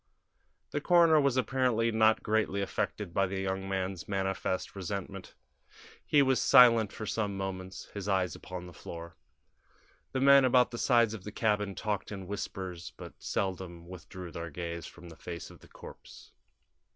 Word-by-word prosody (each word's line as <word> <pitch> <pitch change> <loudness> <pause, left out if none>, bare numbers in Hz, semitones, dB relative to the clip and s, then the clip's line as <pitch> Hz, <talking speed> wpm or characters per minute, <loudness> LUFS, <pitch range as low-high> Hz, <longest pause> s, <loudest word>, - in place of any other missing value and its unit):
The 145 - -2
coroner 165 -2 +5
was 140 -2 +2
apparently 125 -2 +1
not 110 0 +3
greatly 105 -2 0
affected 100 -1 -3
by 95 +1 +2
the 95 +1 -4
young 95 0 -3
man's 95 -2 -3
manifest 95 -1 -2
resentment. 95 0 -6 0.7
He 145 -1 +4
was 130 -1 +2
silent 115 -5 +6
for 110 - -6
some 105 -2 -2
moments, 95 -1 -5
his 100 -1 -5
eyes 95 -2 +1
upon 90 -1 -8
the 90 - -11
floor. 85 +2 -9 1.0
The 130 - -1
men 140 0 +7
about 125 -1 +4
the 120 - -5
sides 120 -4 +3
of 105 -4 -7
the 105 - -7
cabin 105 -2 0
talked 105 -2 -3
in 95 -2 -6
whispers, 95 -3 -6
but - - -9
seldom 90 -3 -3
withdrew 90 0 -9
their 85 0 -6
gaze 85 +1 -5
from 85 0 -13
the 80 - -12
face 85 0 -8
of - - -15
the - - -17
corpse. - - -13
100 Hz, 165 wpm, -30 LUFS, 90-115 Hz, 1.0 s, men